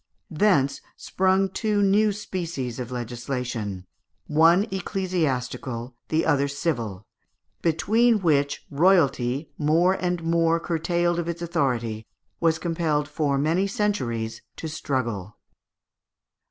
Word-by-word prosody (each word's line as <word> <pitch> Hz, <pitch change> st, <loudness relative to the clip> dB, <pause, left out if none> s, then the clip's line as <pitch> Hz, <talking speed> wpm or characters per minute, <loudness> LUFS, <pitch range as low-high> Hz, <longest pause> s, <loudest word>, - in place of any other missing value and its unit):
Thence 150 Hz, -6 st, +2 dB, 0.2 s
sprung 190 Hz, +1 st, +1 dB
two 210 Hz, +1 st, 0 dB
new 205 Hz, +2 st, +4 dB
species 170 Hz, -, -4 dB
of 125 Hz, -2 st, -4 dB
legislation, 120 Hz, -5 st, -4 dB, 0.4 s
one 165 Hz, +5 st, +5 dB
ecclesiastical, 140 Hz, -, -2 dB
the 160 Hz, +1 st, +1 dB
other 140 Hz, 0 st, +2 dB
civil, 120 Hz, -, -3 dB, 0.6 s
between 220 Hz, +8 st, +3 dB
which 145 Hz, -6 st, +1 dB
royalty, 140 Hz, -4 st, +2 dB
more 165 Hz, +5 st, +3 dB
and 180 Hz, -2 st, -2 dB
more 165 Hz, 0 st, +2 dB
curtailed 175 Hz, +1 st, 0 dB
of 170 Hz, 0 st, -2 dB
its 170 Hz, 0 st, -4 dB
authority, 120 Hz, -10 st, -1 dB, 0.3 s
was 165 Hz, -1 st, +2 dB
compelled 160 Hz, -4 st, -1 dB
for 145 Hz, -3 st, 0 dB
many 165 Hz, +7 st, +1 dB
centuries 125 Hz, -, -2 dB
to 160 Hz, -, -6 dB
struggle. 120 Hz, -, -3 dB
160 Hz, 105 wpm, -25 LUFS, 125-180 Hz, 0.6 s, one